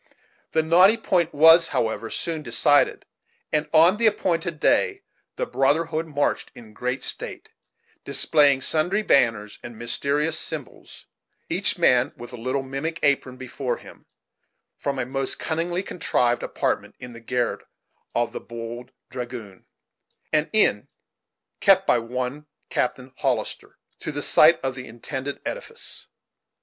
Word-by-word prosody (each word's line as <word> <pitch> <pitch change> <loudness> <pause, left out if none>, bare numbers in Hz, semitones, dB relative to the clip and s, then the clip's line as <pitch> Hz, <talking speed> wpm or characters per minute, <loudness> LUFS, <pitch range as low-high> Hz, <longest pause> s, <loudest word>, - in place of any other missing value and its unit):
The 160 - +2
knotty 180 +7 +5
point 175 -6 0
was, 165 +3 +7
however, 110 0 -2
soon 165 +4 -3
decided; 145 +2 +2 0.5
and, 150 0 0
on 165 +5 +5
the 230 0 +4
appointed 170 -6 -1
day, 400 - +2 0.3
the - - -2
brotherhood 160 - 0
marched 145 -2 -1
in 110 -2 -14
great 125 +4 -3
state, - - -3 0.5
displaying 145 -4 +3
sundry 175 +10 +1
banners 115 - +2
and 120 -2 -10
mysterious 145 +7 +1
symbols, 155 -5 -6 0.4
each 190 +3 +1
man 125 -6 +3
with 120 +1 -10
a - - -5
little 130 +3 -2
mimic 140 +5 -4
apron 135 -2 +1
before 130 -1 -4
him, - - -16 0.7
from 140 -1 -3
a 130 - -1
most 135 +1 -2
cunningly 175 +3 -2
contrived 125 -9 0
apartment - - -2
in 125 -1 -10
the 115 - -11
garret 125 +1 -2 0.5
of 120 0 0
the - - -6
"Bold 120 +1 -8 0.2
Dragoon," 120 -6 -8 0.7
an 155 0 +2
inn 205 - +3 0.7
kept 195 -1 +5
by 120 - +3
one 125 +5 -5 0.2
Captain 130 +1 -2
Hollister, - - -3 0.2
to - - -5
the 145 -1 -3
site 160 +2 +5
of 135 -1 -2
the 125 0 -9
intended 130 +4 -6
edifice. 475 -2 -5
140 Hz, 135 wpm, -24 LUFS, 125-165 Hz, 0.7 s, was